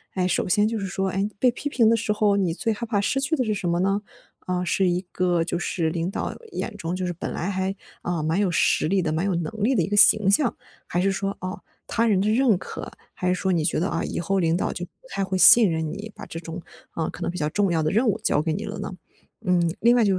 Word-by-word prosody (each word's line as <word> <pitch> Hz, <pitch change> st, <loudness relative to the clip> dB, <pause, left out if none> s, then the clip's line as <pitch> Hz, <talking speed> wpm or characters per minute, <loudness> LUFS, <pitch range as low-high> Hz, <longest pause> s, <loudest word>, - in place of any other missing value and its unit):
诶， 180 Hz, -1 st, +1 dB
首 -, -, 0 dB
先 210 Hz, +2 st, +3 dB
就 225 Hz, 0 st, -2 dB
是 195 Hz, -, -3 dB
说， 190 Hz, +1 st, -2 dB
诶， 195 Hz, +3 st, -1 dB
被 250 Hz, -, +4 dB
批 285 Hz, +4 st, -5 dB
评 230 Hz, -5 st, +3 dB
的 230 Hz, -, +4 dB
时 210 Hz, -1 st, -1 dB
候， 210 Hz, -1 st, +2 dB
你 185 Hz, -5 st, +1 dB
最 225 Hz, +4 st, -1 dB
害 235 Hz, +3 st, -5 dB
怕 210 Hz, -3 st, 0 dB
失 270 Hz, +7 st, 0 dB
去 300 Hz, +4 st, -1 dB
的 255 Hz, -, 0 dB
是 215 Hz, -, 0 dB
什 185 Hz, -3 st, -2 dB
么 170 Hz, +1 st, +1 dB
呢？ 195 Hz, +2 st, +1 dB, 0.4 s
啊， 180 Hz, 0 st, -2 dB
是 185 Hz, 0 st, +2 dB
一 175 Hz, +1 st, +1 dB
个 175 Hz, -2 st, +1 dB
就 175 Hz, +1 st, -3 dB
是 165 Hz, -2 st, -1 dB
领 170 Hz, +2 st, -2 dB
导 -, -, -3 dB, 0.2 s
眼 230 Hz, -, -4 dB
中 175 Hz, -2 st, -4 dB
就 185 Hz, 0 st, -3 dB
是 175 Hz, -, -2 dB
本 170 Hz, -, -5 dB
来 175 Hz, -, -3 dB
还， 190 Hz, 0 st, -1 dB, 0.3 s
呃， 175 Hz, -3 st, -2 dB
蛮 165 Hz, +5 st, 0 dB
有 200 Hz, -3 st, +2 dB
实 165 Hz, -, +2 dB
力 195 Hz, +2 st, +2 dB
的、 155 Hz, -2 st, -1 dB
蛮 165 Hz, +3 st, -1 dB
有 195 Hz, -3 st, 0 dB
能 170 Hz, +3 st, -2 dB
力 260 Hz, +4 st, +3 dB
的 180 Hz, -, +2 dB
一 -, -, -2 dB
个 205 Hz, -, -1 dB
形 205 Hz, -1 st, +7 dB
象， 240 Hz, +4 st, +2 dB, 0.3 s
还 175 Hz, -, -1 dB
是 195 Hz, +2 st, +2 dB
说， 195 Hz, +1 st, -3 dB
啊， 185 Hz, +2 st, -6 dB, 0.3 s
他 230 Hz, 0 st, +1 dB
人 200 Hz, -4 st, +3 dB
的 200 Hz, -, +1 dB
认 230 Hz, -3 st, +3 dB
可， -, -, -8 dB, 0.2 s
还 180 Hz, -, -3 dB
是 180 Hz, -, +2 dB
说 190 Hz, +1 st, -1 dB
你 165 Hz, -3 st, +1 dB
觉 160 Hz, -, 0 dB
得， 180 Hz, -, 0 dB
啊， -, -, -2 dB
以 -, -, -3 dB
后 195 Hz, +3 st, 0 dB
领 165 Hz, 0 st, +2 dB
导 -, -, -1 dB
就 180 Hz, -, -5 dB
不 -, -, -28 dB, 0.2 s
太 195 Hz, -, -2 dB
会 190 Hz, 0 st, -2 dB
信 220 Hz, +2 st, +8 dB
任 160 Hz, -1 st, -2 dB
你， 205 Hz, +2 st, -7 dB
把 -, -, -9 dB
这 165 Hz, -, -7 dB
种， 165 Hz, +1 st, -7 dB, 0.3 s
啊， 160 Hz, -1 st, -3 dB
可 -, -, -10 dB
能 -, -, -1 dB
比 180 Hz, -, -7 dB
较 150 Hz, -, 0 dB
重 200 Hz, -1 st, +1 dB
要 160 Hz, -1 st, +1 dB
的 155 Hz, -, 0 dB
任 230 Hz, +4 st, +2 dB
务 215 Hz, +1 st, +1 dB
交 150 Hz, -, +2 dB
给 160 Hz, 0 st, -1 dB
你 205 Hz, +7 st, -3 dB
了 210 Hz, -1 st, -6 dB
呢？ 200 Hz, -, -5 dB, 0.5 s
嗯， 175 Hz, -2 st, +2 dB
另 240 Hz, +2 st, +4 dB
外 240 Hz, -, +4 dB
就 195 Hz, -3 st, +2 dB
190 Hz, 305 characters per minute, -24 LUFS, 175-210 Hz, 0.5 s, 信